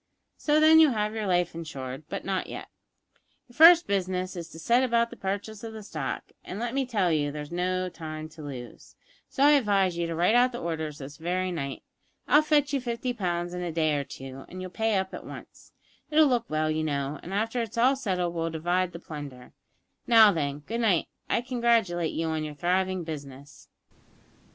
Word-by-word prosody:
So, 300 0 +2
then, 315 +1 +7
you'll 310 -5 +6
have 210 -1 -1
your 220 -2 -3
life 180 -1 +1
insured, 140 -4 -7
but - - -5
not 190 -1 -1
yet. - - -8 0.8
Your 240 - -19
first 335 +3 +8
business 185 -1 -1
is 170 -1 -6
to 160 - -12
set 235 +10 +3
about 235 -2 +2
the - - -8
purchase 205 +1 -4
of 225 -1 -6
the 220 -1 -8
stock, - - -5
and, 185 - -7
let 235 +2 -3
me 270 -1 0
tell 200 -8 +1
you, 145 -2 +1
there's 150 +1 -7
no 185 +1 -1
time 155 -3 -7
to 155 0 -13
lose, 130 -5 -9 0.3
so 275 - 0
I 290 - +7
advise 200 -10 +3
you 170 - 0
to 165 - -3
write 175 +6 +3
out 245 +1 +4
the - - -4
orders 160 -3 -4
this 140 0 -9
very 180 +3 -1
night. 140 -6 -4 0.4
I'll 295 - +6
fetch 295 -2 +2
you 275 - +1
fifty 245 +1 -3
pounds 175 -5 -2
in 180 - -4
a 175 -1 -3
day 155 -1 +1
or 140 - -1
two, 135 0 -9
and 185 - -8
you'll 185 -1 -6
pay 220 +2 0
up 190 0 -2
at - - -7
once. - - -12 0.4
It'll 310 0 +5
look 245 -4 +1
well, 155 0 0
you 155 0 -1
know, 140 -1 -2
and 175 - -9
after 225 +4 -1
it's 230 0 -6
all 255 +4 +4
settled 185 -9 -1
we'll 165 -1 -1
divide 175 +3 -1
the 170 - -7
plunder. 145 -6 -9 0.5
Now 225 -3 +8
then, 145 -4 -3
good 230 +1 -3
night. 200 -7 +2 0.2
I - - +2
congratulate 230 -9 +1
you 165 - -2
on 160 -1 -1
your 150 -1 -6
thriving 185 +3 0
business." 145 -3 -9
185 Hz, 210 wpm, -27 LUFS, 155-230 Hz, 0.8 s, first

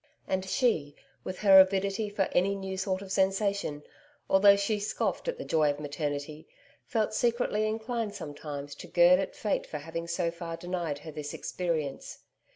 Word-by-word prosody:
And 190 0 0
she 160 - +1 0.3
with 185 - -5
her 195 -2 +9
avidity 195 +2 +3
for 205 -1 0
any 195 +3 +2
new 190 -1 -5
sort 190 0 -2
of 190 - -10
sensation, 195 -5 0 0.5
although 200 +1 +7
she 200 +1 0
scoffed 205 - -2
at - - -1
the - - -6
joy 155 -2 +3
of 145 0 -2
maternity 145 +1 -4 0.4
felt 220 -2 0
secretly 230 -2 +1
inclined 220 -1 -3
sometimes 145 -4 -6
to - - -10
gird 175 +1 +6
at 195 - -3
fate 210 - -1
for 150 - -5
having 165 +3 -6
so 170 0 -1
far 170 -1 -6
denied 175 -4 -3
her 155 +2 -9
this 150 -1 -6
experience. 160 -6 -3
185 Hz, 165 wpm, -29 LUFS, 155-200 Hz, 0.5 s, her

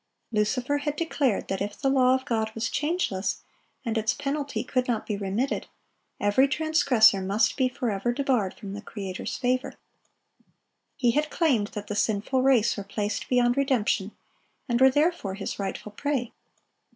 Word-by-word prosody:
Lucifer 245 +6 0
had 295 0 -2
declared 290 -8 0
that 195 0 -3
if 205 +1 -4
the 275 - 0
law 260 -1 +4
of 260 0 -4
God 220 -4 0
was 225 0 -2
changeless, 295 - -1 0.4
and 225 -1 0
its 220 0 0
penalty 280 -5 -2
could 255 0 -1
not 230 -3 -1
be 210 - -2
remitted, 200 +7 -2 0.5
every 205 +7 +4
transgressor 265 -8 +4
must 200 +3 +1
be 260 -1 +2
forever 240 -4 -1
debarred 245 -7 0
from 200 -3 -8
the 205 - -6
Creator's 195 -4 -5
favor. 255 0 -1 1.2
He 240 -2 +2
had 300 +4 0
claimed 265 -13 +2
that 210 -1 -5
the 205 - -4
sinful 220 +5 +1
race 255 -5 +3
were 200 - -4
placed 205 0 -3
beyond 245 0 +3
redemption, 225 -7 +1 0.6
and 240 -1 0
were 265 - +8
therefore 290 - +1
his 195 +1 -5
rightful 200 +2 -4
prey. 260 +1 -2
240 Hz, 160 wpm, -26 LUFS, 210-270 Hz, 1.2 s, were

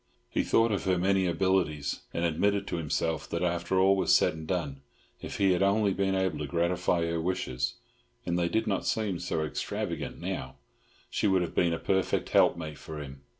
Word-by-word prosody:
He - - +1
thought 115 0 +3
of 100 - -1
her 95 -1 +2
many 95 +1 +2
abilities, 85 -4 0
and 85 - -1
admitted 100 +5 +1
to 90 - -3
himself 80 0 -2
that 85 +1 -2
after 85 +1 0
all 95 +1 +5
was 95 - +4
said - - +3
and 80 0 -8
done, 75 -7 -2 0.4
if - - -6
he 100 -1 +3
had 90 - +1
only 100 0 +3
been 95 0 0
able 95 -4 0
to 75 - -3
gratify 85 0 +1
her 85 0 -1
wishes 80 -8 -2 0.5
(and 85 - -1
they 85 0 +1
did 110 +3 +1
not 100 -3 -1
seem 105 -6 0
so 80 -3 -1
extravagant 75 - -4
now) - - -4 0.6
she - - +1
would 95 -2 +3
have 85 - -5
been 85 -1 +2
a 80 - 0
perfect 95 +2 0
helpmate 80 -3 +2
for 80 - -8
him. 70 -2 -9
90 Hz, 195 wpm, -29 LUFS, 80-95 Hz, 0.6 s, all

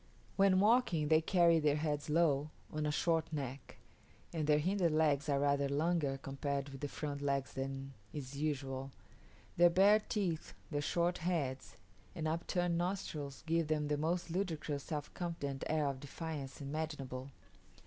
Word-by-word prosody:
When 195 -1 +5
walking 205 -8 +3
they 160 0 +6
carry 170 -1 +4
their 150 -2 +3
heads 150 -1 -1
low, 150 -2 +3 0.2
on 155 0 -1
a - - +1
short 165 +1 +1
neck; 140 -3 -5 0.6
and 155 -3 -1
their 150 -1 +5
hinder 180 +3 +2
legs 155 -1 +2
are 140 -1 +2
rather 140 0 +2
longer 150 -1 +1
compared 140 +1 -3
with 135 -1 -9
the 145 - -1
front 145 0 -4
legs 140 -2 -1
than 135 0 -4 0.2
is 140 -2 -6
usual. 135 -2 -2 0.7
Their 175 0 +7
bare 200 +5 +6
teeth, 190 -6 -2 0.2
their 145 -1 0
short 175 +4 +1
heads, 150 -9 -2 0.4
and 160 -2 -2
upturned 170 +1 0
nostrils 155 -7 -3
give 165 -1 +1
them 150 -1 0
the 150 - +2
most 170 +3 -1
ludicrous 160 -6 -2
self 150 -3 -4
confident 145 -6 -3
air 155 -1 +1
of 140 -2 -1
defiance 145 -1 -6
imaginable. 140 -3 -4
150 Hz, 155 wpm, -35 LUFS, 140-170 Hz, 0.7 s, Their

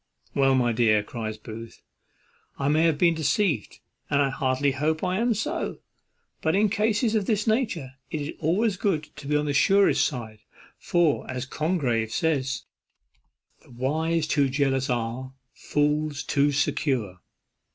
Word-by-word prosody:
"Well, 135 -1 +3
my 120 -2 +2
dear," 110 -2 +3
cries 110 -1 -5
Booth, 115 +1 -10 0.7
"I 140 0 0
may 155 +2 +3
have 160 -3 +2
been 170 +1 +4
deceived, 160 - 0 0.3
and 145 - +2
I 140 -1 +3
heartily 135 +1 +1
hope 155 +4 -1
I 185 +1 0
am 235 0 +2
so; 220 - -3 0.6
but 160 +2 +1
in 210 +1 +3
cases 215 +2 +1
of 210 -3 0
this 215 -2 +1
nature 215 - 0 0.2
it 155 - -3
is 145 +1 -4
always 190 +6 +1
good 160 -7 -1
to 140 - -9
be 150 - +1
on 150 0 +1
the 145 - -1
surest 195 +8 +4
side; 115 -7 -4 0.4
for, 170 -4 +1
as 130 0 -3
Congreve 130 -8 -1
says, 135 -6 0 1.0
'The - - -22
wise 155 +6 0
too 145 -3 +2
jealous 135 0 0
are: 125 +2 -3 0.2
fools 150 0 -1
too 145 0 +2
secure. 130 - -1
145 Hz, 150 wpm, -25 LUFS, 130-170 Hz, 1.0 s, been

